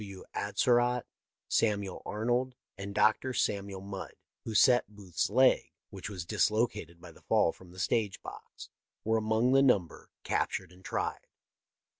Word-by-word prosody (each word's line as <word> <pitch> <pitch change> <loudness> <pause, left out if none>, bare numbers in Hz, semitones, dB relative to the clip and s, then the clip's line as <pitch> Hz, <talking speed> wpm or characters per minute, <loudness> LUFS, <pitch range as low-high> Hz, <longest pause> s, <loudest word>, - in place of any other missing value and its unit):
W. 100 -2 -9
Atzerodt, 120 -1 +2 0.4
Samuel 100 -4 0
Arnold, 120 +4 -1 0.2
and 100 +1 -7
Dr. 130 +4 +3
Samuel 100 -4 -1
Mudd, 100 -1 -7 0.3
who 110 - -4
set 125 -3 +5
Booth's 100 -5 -3
leg, 130 +5 +3 0.2
which - - -7
was 90 -5 -6
dislocated 105 -3 0
by - - -12
the - - -19
fall - - +3
from 95 - -16
the 90 - -15
stage 105 +1 0
box, - - -10 0.3
were 110 +1 +2
among 110 +3 +2
the 135 +1 +6
number 105 -11 +1
captured 95 -2 -1
and 90 +1 -18
tried. - - -3
105 Hz, 145 wpm, -31 LUFS, 95-120 Hz, 0.4 s, the